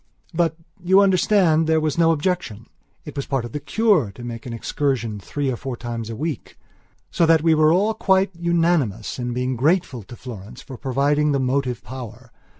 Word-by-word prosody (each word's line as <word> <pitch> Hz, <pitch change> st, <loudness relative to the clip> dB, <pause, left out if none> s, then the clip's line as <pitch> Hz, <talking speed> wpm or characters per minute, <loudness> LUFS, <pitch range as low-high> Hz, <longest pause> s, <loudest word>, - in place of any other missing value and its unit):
But, 165 Hz, -1 st, 0 dB, 0.3 s
you 190 Hz, +2 st, +5 dB
understand, 185 Hz, -4 st, +3 dB
there 160 Hz, 0 st, +3 dB
was 155 Hz, -2 st, -1 dB
no 165 Hz, -1 st, +4 dB
objection. 155 Hz, -, -2 dB, 0.4 s
It 150 Hz, -, -9 dB
was 140 Hz, -, -4 dB
part 135 Hz, -4 st, -1 dB
of 120 Hz, -, -8 dB
the 150 Hz, -, -4 dB
cure 175 Hz, -, +2 dB
to 120 Hz, -, -10 dB
make 120 Hz, 0 st, -7 dB
an -, -, -5 dB
excursion 115 Hz, -2 st, -2 dB
three 140 Hz, +7 st, -3 dB
or -, -, -2 dB
four 130 Hz, 0 st, -6 dB
times 115 Hz, -1 st, -5 dB
a 115 Hz, -, -5 dB
week. 150 Hz, +1 st, -5 dB, 0.5 s
So 165 Hz, -, +2 dB
that 160 Hz, -1 st, +4 dB
we 165 Hz, -1 st, +4 dB
were 155 Hz, 0 st, +4 dB
all 200 Hz, +6 st, +2 dB
quite 190 Hz, -2 st, +2 dB
unanimous 170 Hz, -, 0 dB
in 120 Hz, 0 st, -3 dB
being 125 Hz, +1 st, -1 dB
grateful 145 Hz, -1 st, +1 dB
to 110 Hz, +4 st, -12 dB
Florence 120 Hz, 0 st, -10 dB
for 130 Hz, -, -9 dB
providing 145 Hz, +3 st, +1 dB
the 140 Hz, -, +1 dB
motive 130 Hz, -2 st, -1 dB
power. 125 Hz, -2 st, -9 dB
140 Hz, 190 wpm, -22 LUFS, 120-165 Hz, 0.5 s, you